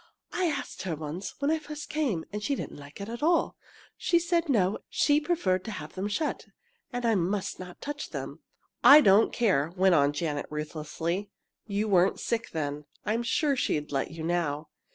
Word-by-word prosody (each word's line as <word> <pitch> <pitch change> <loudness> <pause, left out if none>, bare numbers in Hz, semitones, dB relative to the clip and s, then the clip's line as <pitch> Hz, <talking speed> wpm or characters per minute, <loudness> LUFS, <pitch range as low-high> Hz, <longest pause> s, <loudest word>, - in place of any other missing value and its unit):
"I 365 +1 +1
asked 300 -4 -3
her 175 -4 -2
once, 155 +5 -6
when 285 +2 +1
I 320 - +1
first 300 0 -7
came, 270 - -1
and 210 - -3
she 280 +6 0
didn't 150 - -6
like 145 +4 -12
it 200 - -5
at 235 +1 -6
all! 330 +2 +2 0.4
She 345 - +2
said 340 -1 +1
no, 200 -6 +2
she 295 0 +3
preferred 190 - +1
to 220 - -4
have 155 0 -8
them 190 +2 -2
shut, 295 +9 -2 0.4
and 245 -1 -3
I 230 - +4
must 195 +1 -1
not 180 -1 -9
touch 290 +1 -5
them." - - -6 0.4
"I 295 +2 +10
don't 205 -2 +5
care!" 170 -10 +2
went 190 0 +4
on 145 -3 +4
Janet, 145 -1 -2
ruthlessly. 160 +5 -3 0.4
"You 205 +1 -1
weren't 185 -2 +3
sick 230 -1 -2
then. 145 -2 -3 0.2
I'm 220 +3 +1
sure 280 +4 +1
she'd 150 - -1
let 135 -1 -1
you 160 -1 -7
now!" 160 -3 -1
200 Hz, 190 wpm, -28 LUFS, -, 0.4 s, I